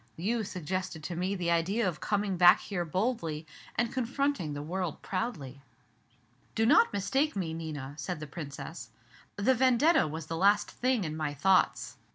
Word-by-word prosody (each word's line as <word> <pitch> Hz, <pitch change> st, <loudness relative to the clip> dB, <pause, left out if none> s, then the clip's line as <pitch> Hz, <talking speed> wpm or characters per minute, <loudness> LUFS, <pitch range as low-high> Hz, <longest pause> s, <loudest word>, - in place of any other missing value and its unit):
You 220 Hz, +7 st, 0 dB
suggested 185 Hz, -2 st, -4 dB
to 175 Hz, -, -4 dB
me 185 Hz, +3 st, -1 dB
the 175 Hz, -2 st, -1 dB
idea 190 Hz, +6 st, +1 dB
of 165 Hz, -4 st, -3 dB
coming 205 Hz, -2 st, -1 dB
back 175 Hz, 0 st, +7 dB
here 185 Hz, -4 st, -3 dB
boldly, 170 Hz, -3 st, -2 dB, 0.3 s
and 235 Hz, 0 st, 0 dB
confronting 260 Hz, -, -1 dB
the 145 Hz, -, -5 dB
world 180 Hz, 0 st, -4 dB
proudly." 155 Hz, -, -4 dB, 0.9 s
"Do 225 Hz, -, +2 dB
not 455 Hz, -, +5 dB
mistake 265 Hz, +9 st, 0 dB
me, 175 Hz, -5 st, -2 dB
Nina," 150 Hz, -4 st, -6 dB
said 150 Hz, +4 st, -4 dB
the 150 Hz, -, -6 dB
Princess, 140 Hz, -5 st, -8 dB, 0.5 s
"the 215 Hz, +6 st, +3 dB
'Vendetta' 260 Hz, -, +4 dB
was 160 Hz, +1 st, -5 dB
the 165 Hz, -, -4 dB
last 205 Hz, +3 st, +3 dB
thing 250 Hz, -4 st, 0 dB
in 155 Hz, -2 st, -4 dB
my 150 Hz, -2 st, -3 dB
thoughts. 185 Hz, +6 st, +2 dB
185 Hz, 165 wpm, -30 LUFS, 155-225 Hz, 0.9 s, back